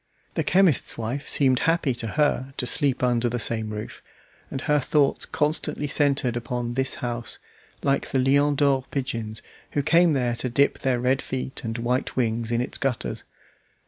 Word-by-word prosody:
The - - 0
chemist's 185 -7 +3
wife 120 +6 -4
seemed 130 -3 +3
happy 165 -5 +1
to 120 -1 -5
her 135 -3 +1
to - - -1
sleep 135 0 +3
under 120 -1 +2
the 120 - -2
same 110 -1 -1
roof, 105 0 -7 0.5
and 135 - -4
her 150 0 +2
thoughts 140 +1 +1
constantly 150 0 -1
centered 140 -4 +1
upon 120 0 -3
this 130 +1 -1
house, 120 -1 -4 0.5
like 140 0 +1
the 135 - 0
"Lion 140 +3 +3
d'Or" 135 -2 +2
pigeons, 115 -6 -4 0.3
who 145 - 0
came 165 +2 +4
there 125 -3 0
to 125 - -2
dip 140 +4 +2
their 130 -2 0
red 130 +2 +1
feet 130 +2 -5
and 115 0 -3
white 125 +2 -1
wings 115 -2 -1
in 120 0 +1
its 125 - -4
gutters. 135 -3 -2
130 Hz, 175 wpm, -25 LUFS, 120-140 Hz, 0.5 s, came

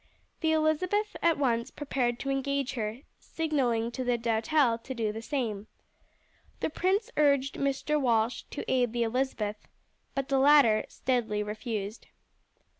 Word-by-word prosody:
The 320 - +1
Elizabeth 350 +7 +1
at 335 -2 +3
once 240 -3 +1
prepared 255 -5 -1
to 275 - -2
engage 275 0 -1
her, 225 0 -3 0.2
signalling 250 -8 -1
to 255 +2 -4
the 245 -1 +1
Doutelle 235 +2 +2
to 260 +3 -7
do 220 -3 -1
the 220 +1 -6
same. 225 -6 -3 0.9
The - - -1
prince 385 +7 0
urged 280 -2 +3
Mr. 280 +2 0
Walsh 230 -2 +1
to - - -5
aid 245 -3 +1
the 240 -1 +1
Elizabeth, 225 -3 -2 0.5
but 275 -1 -1
the 270 -1 +2
latter 270 -6 +6
steadily 225 -5 -1
refused. 210 0 -5
255 Hz, 140 wpm, -29 LUFS, 230-285 Hz, 0.9 s, latter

